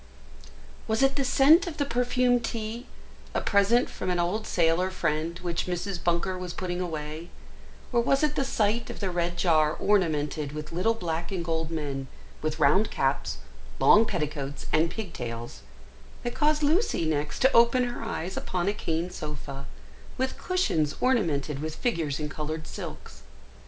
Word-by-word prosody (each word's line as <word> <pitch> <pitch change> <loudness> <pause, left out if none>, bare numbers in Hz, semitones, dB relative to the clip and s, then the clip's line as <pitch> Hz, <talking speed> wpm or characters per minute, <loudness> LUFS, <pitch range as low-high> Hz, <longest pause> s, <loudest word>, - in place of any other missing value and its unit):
WAS 220 +4 +2
it 270 0 +4
the 275 - +1
scent 295 +7 +5
of 320 -3 -5
the 285 - +1
perfumed 245 -1 +2
tea, 230 +2 -4 0.5
a - - +3
present 210 +4 +3
from 185 - -5
an 180 - +1
old 195 +6 -1
sailor 170 +2 +2
friend, 165 -2 -1
which 175 0 -2
Mrs. 180 0 -3
Bunker 175 +2 0
was 180 -1 -5
putting 180 -1 -3
away, 160 -1 -5 0.6
or 235 - +4
was 275 +4 +2
it 300 - +2
the 275 - +1
sight 230 -3 0
of - - -7
the 195 -3 -1
red 175 0 -1
jar 155 -3 +3
ornamented 155 -7 +1
with 150 0 -6
little 185 +7 +1
black 170 -3 -3
and 180 -3 -3
gold 160 -1 -1
men, 140 -4 -3 0.3
with 155 0 -2
round 165 +8 +4
caps, 135 - -1 0.4
long 220 +2 +6
petticoats, 145 -3 -3
and 160 +2 +4
pigtails, 120 - -6 0.6
that 240 - -2
caused 300 0 +2
Lucy 315 - +2
next 150 -1 -1
to 265 - +4
open 235 +2 +5
her 245 0 -3
eyes 190 -5 -4
upon 180 0 -2
a 200 - +2
cane 170 -3 -2
sofa, 140 -4 -6 0.5
with 260 +1 -1
cushions 170 - 0
ornamented 160 - +1
with 155 +1 -4
figures 160 - -1
in 150 - -2
coloured 155 +1 -4
silks? 65 0 -8
175 Hz, 160 wpm, -27 LUFS, 155-230 Hz, 0.6 s, long